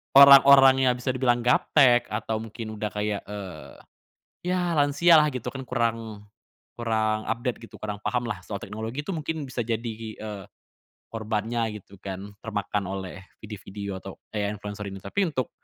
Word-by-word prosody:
orang-orang 135 Hz, -1 st, +9 dB
yang 125 Hz, -, +4 dB
bisa 125 Hz, +1 st, -1 dB
dibilang 120 Hz, -2 st, +1 dB
gaptek 125 Hz, 0 st, +4 dB
atau 110 Hz, -1 st, -2 dB
mungkin 110 Hz, 0 st, -7 dB
udah 105 Hz, 0 st, -3 dB
kayak, 105 Hz, -1 st, -2 dB
eee, 95 Hz, -9 st, -8 dB, 0.7 s
ya 180 Hz, -1 st, 0 dB
lansia 150 Hz, +4 st, +5 dB
lah 150 Hz, -1 st, +5 dB
gitu 125 Hz, -3 st, -6 dB
kan 135 Hz, -1 st, -5 dB
kurang 115 Hz, -4 st, -2 dB, 0.5 s
kurang 110 Hz, -2 st, 0 dB
update 120 Hz, -1 st, -2 dB
gitu, -, -, -13 dB
kurang 105 Hz, -1 st, -5 dB
paham 125 Hz, -1 st, -1 dB
lah 100 Hz, -5 st, -4 dB
soal 100 Hz, -, -5 dB
teknologi 110 Hz, +9 st, -6 dB
itu 195 Hz, -, -3 dB
mungkin 155 Hz, -1 st, -3 dB
bisa 130 Hz, -1 st, -3 dB
jadi, 115 Hz, 0 st, -2 dB, 0.2 s
eee, 105 Hz, -2 st, -7 dB, 0.7 s
korbannya 110 Hz, 0 st, -2 dB
gitu 100 Hz, +2 st, -17 dB
kan, 100 Hz, +2 st, -7 dB
termakan 105 Hz, -2 st, -2 dB
oleh 95 Hz, 0 st, -6 dB, 0.2 s
video-video 100 Hz, -2 st, -7 dB
atau 95 Hz, -, -9 dB, 0.2 s
AI 105 Hz, -1 st, 0 dB
influencer 105 Hz, 0 st, -7 dB
ini. 95 Hz, -, -9 dB
Tapi 165 Hz, -, -1 dB
untuk 130 Hz, -4 st, -2 dB
110 Hz, 155 wpm, -26 LUFS, 105-130 Hz, 0.7 s, orang-orang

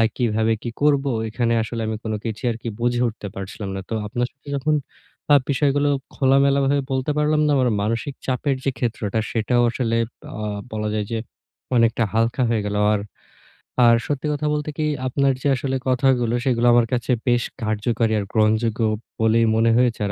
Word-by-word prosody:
আ -, -, +5 dB
কিভাবে 110 Hz, -2 st, +1 dB
কি 120 Hz, -, -3 dB
করবো? 140 Hz, -2 st, +3 dB, 0.2 s
এখানে 115 Hz, +1 st, 0 dB
আসলে 115 Hz, +1 st, -4 dB
আমি 110 Hz, 0 st, -2 dB
কোন 110 Hz, -, -2 dB
কিছুই 110 Hz, +1 st, -4 dB
আরকি 115 Hz, +1 st, -6 dB
বুঝে 120 Hz, 0 st, +1 dB
উঠতে 110 Hz, -2 st, -8 dB
পারছিলাম 95 Hz, +1 st, -6 dB
না। -, -, -3 dB
তো -, -, -1 dB
আপনার 120 Hz, +3 st, -1 dB
সাথে 135 Hz, +2 st, -19 dB
যখন 150 Hz, +3 st, +1 dB, 0.6 s
আ -, -, +9 dB, 0.2 s
বিষয়গুলো 145 Hz, +1 st, +2 dB, 0.2 s
খোলামেলাভাবে 140 Hz, +1 st, +3 dB
বলতে 130 Hz, +2 st, -1 dB
পারলাম 150 Hz, 0 st, +2 dB
না, -, -, +2 dB
আমার 130 Hz, -2 st, +2 dB
মানসিক 115 Hz, +6 st, -2 dB
চাপের 135 Hz, +1 st, 0 dB
যে 135 Hz, -, +2 dB
ক্ষেত্রটা 115 Hz, -3 st, -2 dB
সেটাও 120 Hz, +2 st, +1 dB
আসলে 115 Hz, -1 st, -1 dB, 0.4 s
আ -, -, -4 dB, 0.3 s
বলা 105 Hz, -1 st, -2 dB
যায় 105 Hz, -1 st, -1 dB
যে 115 Hz, -, 0 dB, 0.6 s
অনেকটা 115 Hz, 0 st, +3 dB
হালকা 115 Hz, +3 st, +1 dB
হয়ে 110 Hz, -3 st, +1 dB
গেল। 105 Hz, 0 st, -2 dB, 0.2 s
আর 105 Hz, -, 0 dB, 0.9 s
আর, 115 Hz, -, +7 dB
সত্যি 145 Hz, -1 st, -2 dB
কথা 150 Hz, +1 st, -2 dB
বলতে 150 Hz, 0 st, -2 dB
কি 155 Hz, -, 0 dB, 0.2 s
আপনার 135 Hz, +1 st, +2 dB
যে -, -, 0 dB
আসলে 130 Hz, +1 st, -2 dB
কথাগুলো 125 Hz, -2 st, +2 dB
সেগুলো 120 Hz, -2 st, +2 dB
আমার 120 Hz, -1 st, +4 dB
কাছে 125 Hz, +1 st, 0 dB, 0.2 s
বেশ 120 Hz, -1 st, +3 dB, 0.2 s
কার্যকারী 110 Hz, +1 st, 0 dB
আর 100 Hz, -, -3 dB
গ্রহণযোগ্য 110 Hz, +1 st, +2 dB, 0.4 s
বলেই 110 Hz, +1 st, +4 dB
মনে 115 Hz, +1 st, +3 dB
হয়েছে। 125 Hz, -3 st, +2 dB
আর 100 Hz, -, -2 dB
120 Hz, 180 wpm, -22 LUFS, 110-135 Hz, 0.9 s, আ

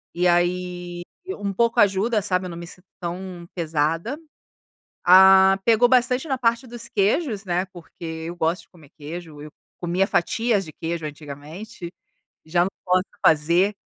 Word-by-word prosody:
e 180 Hz, +1 st, +2 dB
aí 175 Hz, 0 st, -1 dB, 0.2 s
e, 380 Hz, +1 st, -5 dB
um 200 Hz, -1 st, -4 dB
pouco 235 Hz, +3 st, +1 dB
ajuda, 205 Hz, +2 st, +2 dB
sabe, 185 Hz, -2 st, 0 dB
eu -, -, -7 dB
não 170 Hz, -, -8 dB
me 170 Hz, -, -7 dB
sinto 180 Hz, +2 st, -12 dB
tão 175 Hz, 0 st, -6 dB
pesada. 165 Hz, -, -1 dB, 0.9 s
Ah, 190 Hz, +1 st, +7 dB
pegou 235 Hz, +1 st, +4 dB
bastante 250 Hz, +2 st, +2 dB
na 265 Hz, -3 st, -1 dB
parte 235 Hz, +1 st, +1 dB
dos 235 Hz, 0 st, -9 dB
queijos, 210 Hz, -, 0 dB
né, 180 Hz, 0 st, -1 dB
porque 180 Hz, -2 st, -16 dB, 0.3 s
eu 170 Hz, -, -6 dB
gosto 165 Hz, +2 st, 0 dB
de -, -, -24 dB
comer 160 Hz, -6 st, -19 dB
queijo, 155 Hz, 0 st, -8 dB
eu 150 Hz, 0 st, -10 dB, 0.3 s
comia 180 Hz, +3 st, +1 dB
fatias 220 Hz, +3 st, +1 dB
de 155 Hz, -, -10 dB
queijo 165 Hz, +1 st, -4 dB
antigamente. 155 Hz, +6 st, -8 dB, 0.6 s
Já 175 Hz, +2 st, +2 dB
não 195 Hz, -, -4 dB
posso 185 Hz, 0 st, +3 dB, 0.2 s
fazer. 170 Hz, +6 st, +3 dB
180 Hz, 160 wpm, -23 LUFS, 170-205 Hz, 0.9 s, Ah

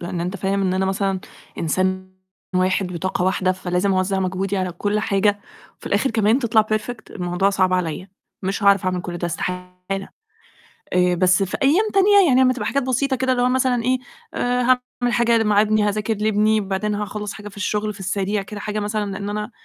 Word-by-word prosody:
لأن 175 Hz, 0 st, -4 dB
أنت 180 Hz, +3 st, -3 dB
فاهم 195 Hz, +1 st, -1 dB
إن 185 Hz, -1 st, +1 dB
أنا 190 Hz, 0 st, +1 dB
مثلًا 195 Hz, -1 st, -1 dB, 0.4 s
إنسان 185 Hz, +3 st, -1 dB, 0.4 s
1 185 Hz, 0 st, +1 dB
وطاقة 180 Hz, +1 st, -1 dB
1 185 Hz, 0 st, +1 dB
فلازم 185 Hz, +1 st, -1 dB
أوَزّع 185 Hz, +1 st, 0 dB
مجهودي 190 Hz, +1 st, -1 dB
على 185 Hz, -2 st, -2 dB
كلّ 205 Hz, +4 st, -1 dB
حاجة، 205 Hz, 0 st, +1 dB, 0.4 s
في -, -, -13 dB
الآخر 210 Hz, +7 st, +1 dB
كمان 220 Hz, +2 st, +3 dB
تطلع 220 Hz, -4 st, +3 dB
perfect 215 Hz, +2 st, -3 dB
الموضوع 180 Hz, +1 st, 0 dB
صعب 185 Hz, -2 st, +1 dB
عليّا، 180 Hz, +1 st, -2 dB, 0.3 s
مش 195 Hz, +2 st, -2 dB
عارف 200 Hz, -1 st, +4 dB
أعمل 185 Hz, -1 st, 0 dB
كلّ 175 Hz, -1 st, -5 dB
ده، 175 Hz, -, -2 dB
إستحالة. 180 Hz, +2 st, -4 dB, 1.2 s
آآ، 180 Hz, 0 st, +3 dB
بس 185 Hz, +2 st, +3 dB
في 185 Hz, -, -3 dB
أيام 325 Hz, +11 st, +4 dB
تانية، 395 Hz, -1 st, +5 dB
يعني 260 Hz, -2 st, +4 dB
لمّا 255 Hz, 0 st, +4 dB
تبقى 240 Hz, -5 st, -5 dB
حاجات 280 Hz, -1 st, 0 dB
بسيطة 265 Hz, +2 st, 0 dB
كده 260 Hz, 0 st, 0 dB
اللي 250 Hz, -1 st, +1 dB
هو 250 Hz, -, +3 dB
مثلًا 250 Hz, -2 st, +1 dB
إيه، 255 Hz, +1 st, +2 dB, 0.4 s
آآ، 245 Hz, 0 st, 0 dB
هاعمل 250 Hz, -1 st, 0 dB
حاجة 235 Hz, -1 st, +3 dB
مع 210 Hz, -1 st, +4 dB
ابني، 215 Hz, 0 st, +2 dB
هاذاكر 210 Hz, +2 st, 0 dB
لابني، 215 Hz, +1 st, +2 dB
وبعدين 200 Hz, +2 st, -2 dB
هاخلّص 210 Hz, 0 st, -4 dB
حاجة 210 Hz, -1 st, -9 dB
في 200 Hz, -, -16 dB
الشغل 210 Hz, +1 st, -1 dB
في 200 Hz, -, -14 dB
السريع 195 Hz, +2 st, -1 dB
كده، 205 Hz, +1 st, -8 dB
حاجة 210 Hz, +1 st, -3 dB
مثلًا 210 Hz, -1 st, -2 dB
لأن 200 Hz, +1 st, -5 dB
أنا 210 Hz, +2 st, -4 dB
205 Hz, 195 wpm, -21 LUFS, 185-220 Hz, 1.2 s, تانية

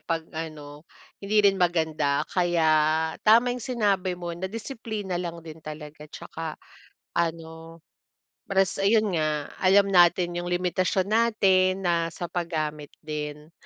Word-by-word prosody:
'pag 165 Hz, -1 st, -3 dB
ano 155 Hz, -2 st, -8 dB, 0.4 s
hindi 210 Hz, +1 st, +2 dB
rin 195 Hz, -1 st, +5 dB
maganda 160 Hz, -5 st, +1 dB
kaya 175 Hz, -3 st, +2 dB, 0.6 s
tama 235 Hz, +3 st, +5 dB
yung 250 Hz, -, -5 dB
sinabi 200 Hz, -6 st, 0 dB
mo 175 Hz, -1 st, -6 dB
na 180 Hz, -, -6 dB
disiplina 220 Hz, -4 st, -5 dB
lang 170 Hz, -1 st, -5 dB
din 160 Hz, 0 st, -10 dB
talaga 150 Hz, 0 st, -9 dB
'tsaka 160 Hz, +1 st, -7 dB, 0.6 s
ano 165 Hz, 0 st, -3 dB, 0.7 s
res 195 Hz, -1 st, +1 dB
ayun 210 Hz, -1 st, +3 dB
nga 150 Hz, -1 st, -1 dB
alam 195 Hz, +1 st, +5 dB
natin 175 Hz, 0 st, +4 dB
yung 175 Hz, -, -5 dB
limitasyon 180 Hz, +1 st, 0 dB
natin 195 Hz, -4 st, +2 dB
na 170 Hz, -1 st, +1 dB
sa 175 Hz, -, -6 dB
paggamit 155 Hz, -4 st, -3 dB, 0.2 s
din. 150 Hz, 0 st, -6 dB
175 Hz, 125 wpm, -26 LUFS, 160-195 Hz, 0.7 s, rin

